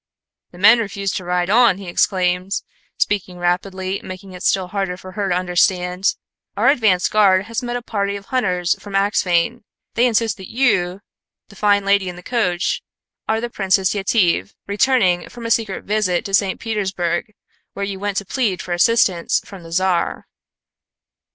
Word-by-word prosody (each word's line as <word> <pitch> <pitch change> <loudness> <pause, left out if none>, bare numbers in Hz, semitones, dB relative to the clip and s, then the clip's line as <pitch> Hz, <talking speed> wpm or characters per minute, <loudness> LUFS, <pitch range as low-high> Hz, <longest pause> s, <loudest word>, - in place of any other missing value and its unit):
"The 175 - -16
men 220 +6 +6
refuse 200 -3 -2
to 185 - -4
ride 180 +1 0
on," 235 -4 +5
he 195 -2 -9
exclaimed, 180 +1 +1 0.4
speaking 190 -3 -1
rapidly, 185 +2 -2
making 185 0 -9
it 180 - -10
still 190 -2 +1
harder 195 -2 -2
for 185 0 -11
her 195 0 -2
to 175 - +1
understand. 180 +1 +1 0.4
"Our - - +4
advance 220 -10 +3
guard 195 -3 +3
has 230 +3 -3
met 240 -1 -4
a 245 - -4
party 200 -3 -2
of 200 0 -8
hunters 180 -9 0
from 205 -1 -7
Axphain. 195 +2 +1 0.3
They 240 +2 +3
insist 230 -1 +1
that 190 -2 -10
you 195 -7 +1 0.5
'the 200 - -15
fine 205 0 +2
lady 200 -2 +2
in 180 - -7
the 180 - -12
coach' 200 -6 0 0.5
are 220 0 +2
the 240 - -3
Princess 190 -2 +1
Yetive, 195 - +1
returning 200 -4 +2
from 235 -1 -10
a 230 - -2
secret 220 -4 0
visit 205 -4 0
to 195 - -6
St. 195 -1 +2
Petersburg, 195 -3 -2 0.4
where 200 - -3
you 195 -1 -5
went 200 0 -2
to 200 - -1
plead 205 -5 -1
for 180 - -3
assistance 180 -2 +2
from 195 -3 -11
the 165 0 -12
Czar." 185 0 0
195 Hz, 170 wpm, -20 LUFS, 180-210 Hz, 0.5 s, men